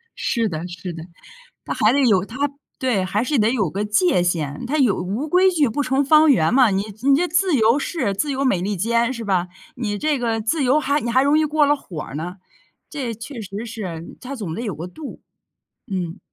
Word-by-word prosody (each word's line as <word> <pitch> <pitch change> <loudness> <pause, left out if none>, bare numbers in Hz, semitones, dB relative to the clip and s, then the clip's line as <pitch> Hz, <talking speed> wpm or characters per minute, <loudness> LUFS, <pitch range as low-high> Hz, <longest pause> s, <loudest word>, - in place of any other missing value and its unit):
是 230 -3 0
的 165 +2 -5
是 175 0 -7
的， 160 -1 -8 0.6
那 - - -2
还 225 -3 +3
得 285 - +3
有 200 -6 +3
它 275 +6 -2 0.3
对， 235 -8 0
还 205 +4 0
是 270 +1 0
得 215 +2 +3
有 205 -11 0
个 205 +2 -2
界 210 - +2
限， 155 -5 -2
它 300 +5 -1
有 245 -8 +3
“无 210 - -3
规 370 +3 +4
矩 300 -7 +2
不 290 +6 -1
成 265 +2 +1
方 310 +1 +6
圆” 210 - +3
嘛， 250 -4 +5
你 195 +1 0 0.2
你 275 0 +5
这 355 +3 +1
自 360 0 +2
由 230 +4 +4
式 270 - -2
自 290 +8 -1
由 275 +1 -1
美 195 -9 +2
利 200 +2 -2
坚 235 +5 +1
是 230 -3 -6
吧？ 185 -3 0 0.3
你 210 -4 -2
这 300 -3 0
个 225 -2 -1
自 275 +6 0
由 265 +5 +4
还 285 +1 +1
你 235 - -4
还 260 +3 +4
容 290 +2 +3
易 310 - +3
过 305 0 +2
了 290 +1 +3
火 170 - -8
儿 - - -10
呢， 175 +4 -5 0.5
这 255 -6 -4
确 230 +2 -8
实 205 +2 -6
是， 185 -7 -7
它 270 +2 -6
总 200 -10 -5
得 235 - -4
有 205 -8 -3
个 165 +4 -6
度， 300 +8 -9 0.7
嗯， 180 -4 -4
230 Hz, 245 characters per minute, -21 LUFS, 195-280 Hz, 0.7 s, 方